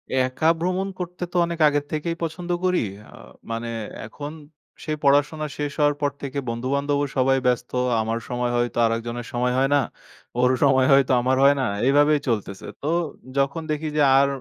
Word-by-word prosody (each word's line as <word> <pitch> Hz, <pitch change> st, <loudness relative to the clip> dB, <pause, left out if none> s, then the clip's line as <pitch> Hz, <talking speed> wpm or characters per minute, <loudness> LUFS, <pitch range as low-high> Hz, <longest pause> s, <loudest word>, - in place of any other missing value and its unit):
একা 130 Hz, +4 st, +1 dB
ভ্রমণ 185 Hz, +2 st, -1 dB
করতে 180 Hz, 0 st, -5 dB
তো, -, -, -15 dB
অনেক 170 Hz, -1 st, -5 dB
আগের 145 Hz, 0 st, +1 dB
থেকেই 160 Hz, +2 st, -2 dB
পছন্দ 175 Hz, +2 st, -5 dB, 0.2 s
করি। 180 Hz, 0 st, +2 dB, 0.3 s
আ -, -, -12 dB, 0.4 s
মানে, 115 Hz, +1 st, -3 dB, 0.4 s
এখন, 145 Hz, +6 st, -7 dB, 0.5 s
সেই 155 Hz, -1 st, -2 dB
পড়াশোনা 145 Hz, +2 st, +3 dB
শেষ 145 Hz, -1 st, -2 dB
হওয়ার 145 Hz, -1 st, +3 dB
পর 145 Hz, -1 st, +1 dB
থেকে, 140 Hz, 0 st, -3 dB
বন্ধু-বান্ধবও 140 Hz, +4 st, -1 dB
সবাই 135 Hz, +1 st, +3 dB
ব্যস্ত। 125 Hz, 0 st, 0 dB, 0.3 s
আমার 115 Hz, +1 st, -2 dB
সময় 125 Hz, 0 st, -1 dB
হয়, 120 Hz, 0 st, +2 dB
তো -, -, -6 dB
আরেকজনের 115 Hz, +1 st, -2 dB
সময় 125 Hz, +1 st, 0 dB
হয় 135 Hz, -, +2 dB
না। -, -, +5 dB, 0.6 s
ওর 125 Hz, +1 st, +4 dB
সময় 130 Hz, -2 st, +4 dB
হয়, 135 Hz, 0 st, +7 dB
তো -, -, +4 dB
আমার 130 Hz, +1 st, +1 dB
হয় 140 Hz, +1 st, +6 dB
না। -, -, +1 dB, 0.2 s
এভাবেই 145 Hz, +2 st, +4 dB
চলতেছে। 100 Hz, -4 st, -2 dB, 0.2 s
তো, 145 Hz, -, -4 dB, 0.5 s
যখন 140 Hz, +4 st, +1 dB
দেখি 155 Hz, +1 st, -2 dB
যে, -, -, +4 dB, 0.2 s
আর 140 Hz, -, +4 dB
140 Hz, 180 wpm, -23 LUFS, 125-150 Hz, 0.6 s, হয়